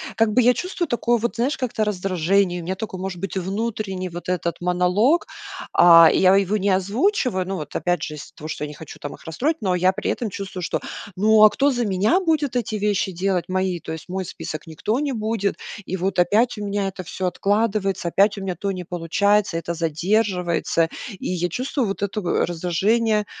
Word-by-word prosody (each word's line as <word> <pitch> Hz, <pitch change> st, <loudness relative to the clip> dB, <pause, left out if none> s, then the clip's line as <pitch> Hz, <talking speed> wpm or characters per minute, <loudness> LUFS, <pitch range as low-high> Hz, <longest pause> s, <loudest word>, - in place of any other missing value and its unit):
как 225 Hz, -1 st, +2 dB
бы 250 Hz, +1 st, +4 dB
я 250 Hz, -, +6 dB
чувствую 360 Hz, +2 st, -3 dB
такое 240 Hz, -1 st, +1 dB
вот, 235 Hz, +2 st, -2 dB
знаешь, 260 Hz, +6 st, 0 dB
как-то 240 Hz, -4 st, -1 dB
раздражение, 185 Hz, -2 st, +1 dB
у -, -, -9 dB
меня 185 Hz, +3 st, -3 dB
такой 190 Hz, -2 st, -6 dB
может 190 Hz, -2 st, -5 dB
быть 195 Hz, 0 st, -5 dB
внутренний 195 Hz, -1 st, -3 dB
вот 175 Hz, +1 st, -7 dB
этот 175 Hz, -1 st, -2 dB
монолог. 180 Hz, -, +2 dB, 0.5 s
А, 165 Hz, -1 st, +8 dB
я 190 Hz, 0 st, +5 dB
его 200 Hz, +1 st, +2 dB
не 200 Hz, 0 st, 0 dB
озвучиваю. 200 Hz, -, +1 dB
Ну, 195 Hz, -, -2 dB
вот 150 Hz, -4 st, -7 dB
опять 175 Hz, 0 st, 0 dB
же 155 Hz, -, -4 dB
из-за 150 Hz, -, -10 dB
того, 155 Hz, -, -8 dB
что 155 Hz, -, -5 dB
я -, -, -6 dB
не 150 Hz, -, -9 dB
хочу 160 Hz, -, -11 dB
там 145 Hz, -, -6 dB
их -, -, -19 dB
расстроить, 270 Hz, -, -1 dB
но 190 Hz, -4 st, 0 dB
я 185 Hz, +1 st, +3 dB
при 210 Hz, -, -2 dB
этом 235 Hz, -, -3 dB
чувствую, 190 Hz, -2 st, -6 dB
что, -, -, -2 dB, 0.3 s
ну, 215 Hz, +3 st, +4 dB
а 215 Hz, -, +10 dB
кто 280 Hz, +5 st, +2 dB
за 245 Hz, -2 st, -1 dB
меня 200 Hz, -, +2 dB
будет 310 Hz, -8 st, 0 dB
эти 225 Hz, -3 st, -1 dB
вещи 205 Hz, -2 st, 0 dB
делать 185 Hz, 0 st, -1 dB
мои? 185 Hz, -1 st, -1 dB
То -, -, -8 dB
есть 160 Hz, -1 st, -7 dB
мой 185 Hz, +1 st, -3 dB
список 165 Hz, -1 st, -7 dB
никто 210 Hz, -, -2 dB
не 290 Hz, -2 st, -1 dB
будет. 215 Hz, -3 st, -1 dB, 0.3 s
И 190 Hz, -, -2 dB
вот 185 Hz, 0 st, -1 dB
опять 215 Hz, +6 st, +2 dB
у 205 Hz, -, -4 dB
меня 200 Hz, -1 st, -1 dB
это 190 Hz, -1 st, -8 dB
всё 185 Hz, +2 st, -5 dB
откладывается, 195 Hz, -1 st, 0 dB
опять 200 Hz, +4 st, +3 dB
у -, -, -5 dB
меня 185 Hz, -2 st, -3 dB
то 200 Hz, -, -2 dB
не 185 Hz, -2 st, -5 dB
получается, 180 Hz, +3 st, +1 dB
это 170 Hz, +1 st, -3 dB
задерживается. 170 Hz, 0 st, 0 dB, 0.3 s
И -, -, -5 dB
я 175 Hz, -1 st, 0 dB
чувствую 255 Hz, -, -2 dB
вот 195 Hz, +1 st, -3 dB
это 200 Hz, +1 st, -2 dB
раздражение, 200 Hz, +6 st, +1 dB
195 Hz, 210 wpm, -22 LUFS, 180-220 Hz, 0.5 s, а